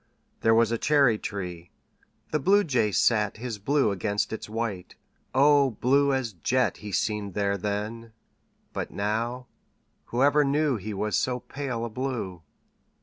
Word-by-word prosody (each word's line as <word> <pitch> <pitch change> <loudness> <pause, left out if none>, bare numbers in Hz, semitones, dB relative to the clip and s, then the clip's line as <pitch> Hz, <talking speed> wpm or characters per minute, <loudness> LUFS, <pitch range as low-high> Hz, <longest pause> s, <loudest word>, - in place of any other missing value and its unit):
There 115 0 +4
was 115 0 +3
a 115 - -1
cherry 140 -7 +3
tree. 90 -4 -6 0.6
The 155 - +1
Bluejay 145 - +3
sat 105 0 +2
His 115 -2 -5
blue 135 +1 +2
against 100 +2 -1
its 110 - -6
white 110 -5 -4 0.4
O 140 0 +5
blue 140 +4 +2
as 130 -5 -1
jet 125 +7 0
He 105 -1 -8
seemed 105 -1 -1
there 100 -1 +1
then! 105 +4 -4 0.6
But - - -3
now 115 +5 -2 0.6
Whoever 145 +4 +3
knew 145 -1 +1
He 105 +1 -6
was 105 0 -1
so 125 +4 0
pale 125 -4 -4
a - - -4
blue! 115 -8 -4
115 Hz, 145 wpm, -26 LUFS, 105-135 Hz, 0.6 s, O